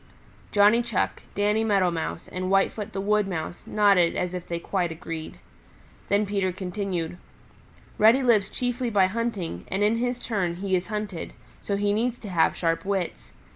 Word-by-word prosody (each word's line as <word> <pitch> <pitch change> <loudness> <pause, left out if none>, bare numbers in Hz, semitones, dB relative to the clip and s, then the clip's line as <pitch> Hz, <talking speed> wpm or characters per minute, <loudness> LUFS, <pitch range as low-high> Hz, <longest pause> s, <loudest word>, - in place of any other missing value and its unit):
Johnny 210 +3 +5
Chuck, 235 -5 -1
Danny 210 +2 +2
Meadow 195 -5 +3
Mouse 165 0 -4
and 185 0 -4
Whitefoot 195 +2 +1
the 195 - -4
Wood 210 +1 +2
Mouse 175 -2 -4
nodded 200 -5 +4
as 180 0 -1
if 180 -1 -5
they 170 - -2
quite 175 0 -1
agreed. 160 -1 -6 0.7
Then 205 +1 +3
Peter 195 -2 0
continued, 180 -2 -3 0.8
"Reddy 230 +5 +6
lives 215 -5 +3
chiefly 245 0 -2
by 200 -4 +4
hunting, 190 - -3
and 195 +2 -1
in 215 +2 +3
his 245 +1 -1
turn 195 -8 -2
he 190 +1 0
is 180 0 -1
hunted, 210 -5 -4 0.3
so 200 - -2
he 205 0 +1
needs 240 +3 0
to 210 - -9
have 170 -3 +2
sharp 165 -1 0
wits. 185 - -3
200 Hz, 170 wpm, -26 LUFS, 180-215 Hz, 0.8 s, Reddy